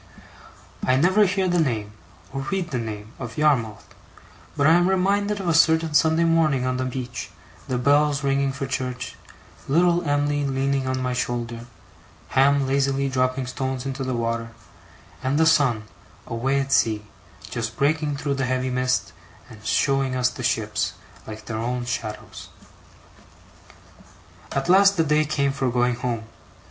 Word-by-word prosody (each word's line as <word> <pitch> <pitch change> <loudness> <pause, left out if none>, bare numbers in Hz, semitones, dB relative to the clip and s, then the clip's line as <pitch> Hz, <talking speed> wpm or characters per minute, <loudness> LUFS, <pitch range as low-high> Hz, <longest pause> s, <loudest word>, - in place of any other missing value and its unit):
I 130 - +3
never 185 +9 +4
hear 190 0 0
the 175 -1 +1
name, 110 -9 -1 0.4
or 135 - -3
read 185 -3 -2
the 125 - -1
name, 110 -1 -6
of 120 -3 -7
Yarmouth, 125 -9 +1 0.7
but 145 - +2
I 160 - +6
am 175 +2 +4
reminded 200 +2 +1
of 190 - -4
a 170 - +3
certain 160 0 +3
Sunday 160 +2 +4
morning 160 -6 +2
on 130 0 -1
the 130 - -1
beach, 125 -1 -5 0.4
the 130 - -1
bells 145 +2 +2
ringing 140 0 +1
for 135 +1 -4
church, 125 -1 -4 0.5
little 175 +4 +3
Em'ly 145 -2 0
leaning 135 0 0
on 130 0 -1
my 125 0 -1
shoulder, 120 -1 -3 0.6
Ham 140 +1 +3
lazily 135 0 +1
dropping 130 0 0
stones 130 0 -4
into 135 0 -3
the 130 -1 -2
water, 115 0 -2 0.7
and 135 +2 0
the 160 - +4
sun, 135 -9 +3 0.4
away 130 +4 0
at 135 0 -3
sea, 110 -2 +2 0.5
just 115 -2 -4
breaking 150 0 +1
through 145 0 -2
the 135 -1 -1
heavy 130 0 -1
mist, 130 0 0 0.4
and 110 -1 -13
showing 135 +3 +1
us 125 -1 +2
the 125 - -8
ships, 110 -3 -1 0.3
like 110 0 -8
their 110 -1 -4
own 120 +1 -2
shadows. 110 -3 -6 2.0
At 135 +2 -2
last 195 +2 +5
the 165 - +4
day 155 0 +2
came 140 -2 0
for 135 -2 -1
going 125 0 +1
home. 120 -2 -3
135 Hz, 155 wpm, -23 LUFS, 125-150 Hz, 2.0 s, I